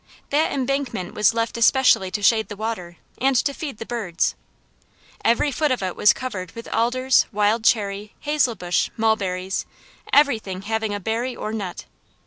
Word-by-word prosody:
That 300 +3 +2
embankment 270 -8 -2
was 210 +1 +4
left 230 0 -1
especially 235 -5 +4
to 205 +2 -4
shade 220 +1 +4
the 205 - -7
water, 195 -6 -5 0.2
and 270 +1 +2
to 280 +3 +2
feed 280 -5 -6
the 225 - -7
birds. 210 -9 -1 0.9
Every 235 +5 +2
foot 300 +2 +1
of 255 -6 -1
it 185 -1 -2
was 210 - +6
covered 190 -9 -5
with 230 - -9
alders, 255 +3 +2
wild 210 +2 +1
cherry, 205 -2 0
hazelbush, 245 -12 0
mulberries, 195 -4 0 0.4
everything 220 -10 +2
having 220 0 -2
a - - -3
berry 230 +5 -2
or 215 - -5
nut. 195 -5 -5
225 Hz, 155 wpm, -22 LUFS, 200-255 Hz, 0.9 s, was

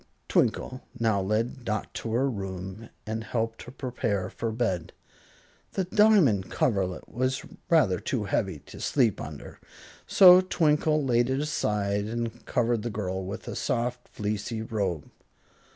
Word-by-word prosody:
Twinkle 130 0 +1 0.2
now 110 -4 +2
led 115 +6 -1
Dot 110 -2 -3
to 115 - -4
her 130 +4 +2
room 95 -1 -5 0.2
and 110 +1 -3
helped 115 0 -2
her 125 - -9
prepare 115 -8 -2
for 115 - -3
bed. 110 -7 -2 0.8
The 190 - 0
diamond 180 - +4
coverlet 95 -6 0
was 130 +1 -1 0.2
rather 110 - +4 0.2
heavy 95 -3 -1
to - - -12
sleep 120 -8 +2
under, - - -9 0.5
so 185 -1 +9
Twinkle 155 -4 +2
laid 120 -1 +2
it 130 +1 0
aside 105 -9 0
and 115 +1 -4
covered 120 -2 +1
the 120 - -3
girl 95 -3 -3
with 100 +3 -6
a - - -4
soft, 125 -1 -2
fleecy 105 +2 -3
robe. 100 -9 -2
115 Hz, 135 wpm, -27 LUFS, 100-130 Hz, 0.8 s, so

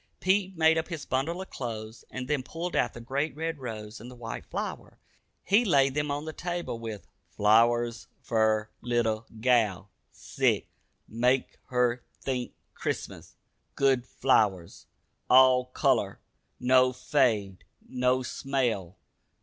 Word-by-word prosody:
Pete 190 -1 +1
made 160 0 +5
up 160 - -4
his 165 -5 -6
bundle 165 +8 -1
of - - -17
clothes, 110 -2 -6
and 130 0 -6
then 145 -1 0
pulled 170 +6 -5
out - - +1
the - - -7
great 140 +5 -2
red 160 0 -3
rose 110 -3 -7
and 120 - -9
the 125 - -11
white 115 -2 -7
flower. - - -5 0.5
He 205 +5 +4
laid 140 - +3
them 150 +1 -1
on 145 +2 -2
the 155 - -5
table 175 -8 -4
with 110 -5 -6 0.2
"Flowers 115 +5 +3
fer 110 -1 +1
little 115 -2 0
gal. 110 -6 +2 0.2
Sick. - - 0 0.4
Make 125 +3 0
her 125 -1 +1 0.2
think 125 -2 -3 0.2
Crissmus. - - -5 0.4
Good 135 -3 +2
flowers. 100 -9 +1 0.4
All 130 0 +6
color. 125 - 0 0.4
No 130 0 +4
fade. 115 -8 +1 0.2
No 125 0 +1
smell. 120 -9 -2
125 Hz, 135 wpm, -28 LUFS, 115-140 Hz, 0.5 s, All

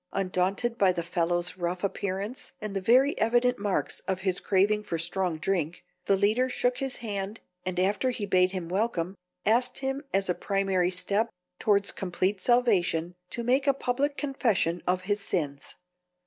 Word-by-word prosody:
Undaunted 195 +5 0
by 195 -2 +5
the 175 -2 -3
fellow's 175 +1 -1
rough 180 +1 -2
appearance 200 +4 -3
and 210 -1 -5
the 195 - 0
very 255 +8 +4
evident 240 +2 +2
marks 200 -2 -1
of 190 -1 -1
his 190 -2 +1
craving 205 +2 +2
for 170 -5 -3
strong 175 0 -1
drink, 170 0 -1 0.2
the 200 - +4
leader 215 +6 +2
shook 245 0 0
his 270 -2 -2
hand 205 0 -3 0.3
and 180 -1 -1
after 205 +7 +2
he 235 -4 -2
bade 185 -1 +3
him 185 -3 -4
welcome 185 -2 -1 0.3
asked 240 +4 +2
him 270 +1 -2
as 195 0 +1
a 180 - +2
primary 195 -2 +1
step 200 +5 0 0.3
towards 200 -1 +3
complete 190 +1 -1
salvation 185 -8 +2 0.2
to 235 - -4
make 260 +4 +2
a 275 - +4
public 275 +3 -1
confession 225 - 0
of 180 0 +1
his 205 +2 0
sins. 145 -8 -3
195 Hz, 165 wpm, -28 LUFS, 180-235 Hz, 0.3 s, by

